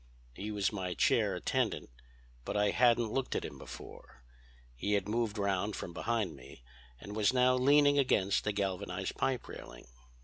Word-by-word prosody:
He 100 +11 -6
was 105 -1 0
my 90 -3 -3
chair - - +2
attendant, - - -1 0.5
but - - -3
I 105 0 +3
hadn't 120 -2 +3
looked 135 -1 -1
at - - -1
him 70 - -8
before. 65 -1 -11 0.5
He 100 +12 -1
had 100 -1 +1
moved 110 0 -1
round 100 0 0
from 85 - -6
behind 110 -3 -1
me 60 -2 -14 0.4
and 100 +9 -8
was 110 +2 +3
now 125 0 +4
leaning 145 +2 +5
against 100 -7 +2
the 105 - 0
galvanized 100 -3 -3
pipe 130 -2 -1
railing. - - -10
105 Hz, 165 wpm, -32 LUFS, 95-120 Hz, 0.5 s, leaning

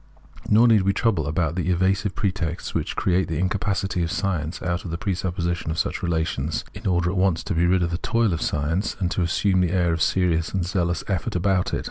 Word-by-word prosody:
Nor 115 +3 +6
need 110 -3 +5
we 100 +1 +2
trouble 95 -12 +1
about 80 0 0
the 90 +1 -2
evasive 95 +2 +1
pretexts 90 -5 -2
which - - -2
create 95 0 +1
the 80 - -3
incapacity 95 +1 -1
of 85 -1 -1
science 90 -5 -2
out 90 +1 -1
of 90 - -6
the 85 - -3
presuppo 90 -1 -2
sition 85 -1 -2
of 80 - -2
such - - -1
relations, 80 -3 -1
in - - -6
order 90 -1 +1
at 95 - -3
once 95 -3 +2
to - - -2
be 85 +1 +2
rid 90 0 +3
of 85 - -1
the 85 - -2
toil 115 -2 +1
of 80 - -3
science, 80 +7 -1
and 90 -3 -1
to - - 0
assume 95 +2 +2
the 90 - +2
air 90 -2 +2
of 80 - -2
serious 85 -1 +1
and 95 -2 0
zealous 85 -2 -1
effort 95 -3 -2
about 90 +1 +1
it. - - -1
90 Hz, 230 wpm, -24 LUFS, 85-95 Hz, -, Nor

